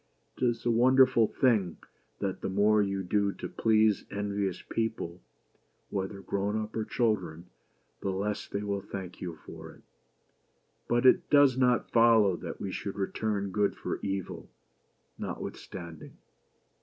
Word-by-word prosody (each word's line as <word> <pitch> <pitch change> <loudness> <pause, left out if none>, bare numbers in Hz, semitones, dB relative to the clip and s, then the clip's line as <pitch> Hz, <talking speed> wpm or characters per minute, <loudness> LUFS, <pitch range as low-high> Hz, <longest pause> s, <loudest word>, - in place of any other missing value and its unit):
It - - -6
is 120 -1 -1
a 120 - +3
wonderful 130 0 +5
thing 105 -10 +1 0.4
that 95 -2 -3
the - - -2
more 105 +2 +3
you 100 -1 -1
do 100 +2 +1
to - - -6
please 110 -2 +2
envious 100 -2 -2
people, 110 -6 -3 0.7
whether 95 0 -3
grown 100 +3 -1
up 110 0 -6
or 110 -1 -1
children, 90 -9 -1 0.5
the 100 - -2
less 100 +2 -2
they 100 - -4
will 100 -1 -2
thank 95 -3 -8
you 85 -3 -5
for - - -10
it. - - -19 1.0
But 120 +1 +1
it 130 - +5
does 145 -3 +6
not 125 -2 +2
follow 115 -5 +5
that - - -7
we 95 - -4
should 100 - -5
return 100 0 -2
good 100 +1 +1
for - - -4
evil, 95 -2 -4 0.7
notwith - - -5
standing 85 -4 -10
100 Hz, 145 wpm, -29 LUFS, 95-115 Hz, 1.0 s, does